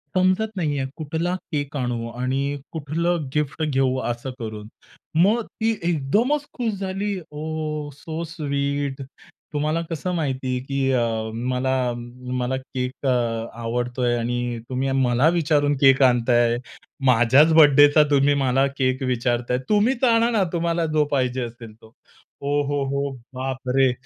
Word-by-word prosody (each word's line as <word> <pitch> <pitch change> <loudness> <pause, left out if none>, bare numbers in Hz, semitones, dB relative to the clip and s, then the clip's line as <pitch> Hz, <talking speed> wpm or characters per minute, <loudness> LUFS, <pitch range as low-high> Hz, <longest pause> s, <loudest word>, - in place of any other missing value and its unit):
समजत 185 +4 +2
नाहीये, 145 -5 -1
कुठला 165 +3 -2 0.2
केक 145 -1 -3
आणू 120 -3 -2
आणि 135 +4 -2
कुठलं 160 +2 -1
गिफ्ट 150 +1 -1
घेऊ," 135 -3 +1
असं 120 +2 -3
करून 110 -2 -6 0.6
मग 220 +5 +3
ती 225 0 -1
एकदमच 205 - +1
खुश 235 -4 -1
झाली, 195 0 -2
ओह, 155 0 -4
सो 160 +4 -6
स्वीट 140 -3 -2 0.5
तुम्हाला 155 +3 0
कसं 165 +2 -3
माहिती 135 -5 -2
आहे, - - -2
की 135 -1 0
अ, 125 -2 +2 0.5
मला 130 -1 0 0.5
मला 125 +1 -1
केक 130 0 -5
अ, - - +3 0.5
आवडतोय 120 +1 -1
आणि 120 0 -2
तुम्ही 130 +1 -1
मला 130 +1 +3
विचारून 150 -4 +2
केक 135 0 +6
आणताय, 120 -1 +3 0.5
माझ्याच 130 +6 +5
बर्थडेचा 145 -1 +7
तुम्ही 140 0 +4
मला 135 -1 +2
केक 130 0 0
विचारताय. 125 -1 0
तुम्हीच 230 +5 +2
आणा 235 -1 +4
ना, 215 -5 +2
तुम्हाला 170 0 0
जो 150 -1 +3
पाहिजे 130 -2 0
असेल 115 -1 -9
तो. 110 - -17 0.5
ओ! 145 +1 +1
हो, 145 0 0
हो, 140 +1 -1 0.2
बापरे! 130 0 0
140 Hz, 135 wpm, -23 LUFS, 130-160 Hz, 0.6 s, बर्थडेचा